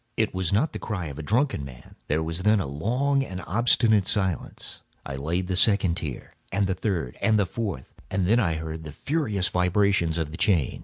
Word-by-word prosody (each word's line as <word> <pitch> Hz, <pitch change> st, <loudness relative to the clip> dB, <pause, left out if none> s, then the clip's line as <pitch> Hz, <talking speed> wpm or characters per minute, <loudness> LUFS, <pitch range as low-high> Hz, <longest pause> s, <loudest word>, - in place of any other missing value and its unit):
It 110 Hz, -, +1 dB
was 95 Hz, -2 st, -1 dB
not 115 Hz, +11 st, +2 dB
the -, -, -4 dB
cry 100 Hz, -6 st, -3 dB
of 70 Hz, +1 st, -8 dB
a -, -, -3 dB
drunken 115 Hz, -, +1 dB
man. 65 Hz, -3 st, -11 dB
There 80 Hz, +2 st, +1 dB
was 80 Hz, +2 st, -2 dB
then 105 Hz, +2 st, +4 dB
a 95 Hz, -, -1 dB
long 125 Hz, -, 0 dB
and 95 Hz, -8 st, -6 dB
obstinate 110 Hz, -1 st, +3 dB
silence. 95 Hz, -, -2 dB, 0.2 s
I 70 Hz, -, -5 dB
laid 80 Hz, +7 st, -1 dB
the 90 Hz, 0 st, -2 dB
second 95 Hz, -3 st, +4 dB
tier, 75 Hz, -9 st, -6 dB, 0.2 s
and 100 Hz, +1 st, +1 dB
the 95 Hz, -, 0 dB
third, 90 Hz, -, -3 dB
and 110 Hz, -1 st, +3 dB
the 100 Hz, -, +3 dB
fourth; 100 Hz, -, -5 dB, 0.2 s
and 95 Hz, -1 st, 0 dB
then 115 Hz, +6 st, +4 dB
I 85 Hz, -8 st, +1 dB
heard 80 Hz, 0 st, -5 dB
the 75 Hz, -, -7 dB
furious 110 Hz, -, -1 dB
vibrations 90 Hz, -2 st, +2 dB
of 80 Hz, -2 st, -2 dB
the 80 Hz, -, -7 dB
chain. 90 Hz, -, +1 dB
95 Hz, 210 wpm, -26 LUFS, 80-105 Hz, 0.2 s, then